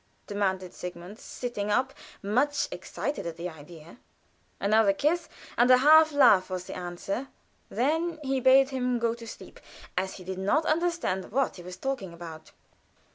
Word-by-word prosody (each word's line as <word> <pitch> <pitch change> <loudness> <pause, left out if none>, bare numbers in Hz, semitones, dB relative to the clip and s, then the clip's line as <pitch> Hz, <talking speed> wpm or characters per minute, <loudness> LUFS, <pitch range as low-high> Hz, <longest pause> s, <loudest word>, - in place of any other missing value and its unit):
demanded 190 -3 -2
Sigmund, 180 +4 -8
sitting 225 -5 -5
up, 255 +5 +1 0.3
much 270 +8 +1
excited 285 -11 -4
at 165 - -6
the 170 +1 -4
idea. 160 +2 -12 0.6
Another 205 0 +4
kiss 310 - 0 0.3
and 245 +1 +5
a 255 - +8
half 310 +4 +7
laugh 245 -11 +5
was 185 -1 -4
the - - -8
answer. 180 +8 -4 0.4
Then 320 +6 0
he 270 -1 0
bade 265 +1 +5
him 250 -2 0
go 230 -1 0
to 230 -1 -10
sleep, - - -11 0.4
as 190 +1 -2
he 185 - -10
did 190 +1 -5
not 250 +12 +1
understand 335 - -1
what 265 0 0
he - - -9
was 180 +1 -9
talking 240 -6 -4
about. 165 -2 -10
220 Hz, 160 wpm, -28 LUFS, 185-270 Hz, 0.6 s, a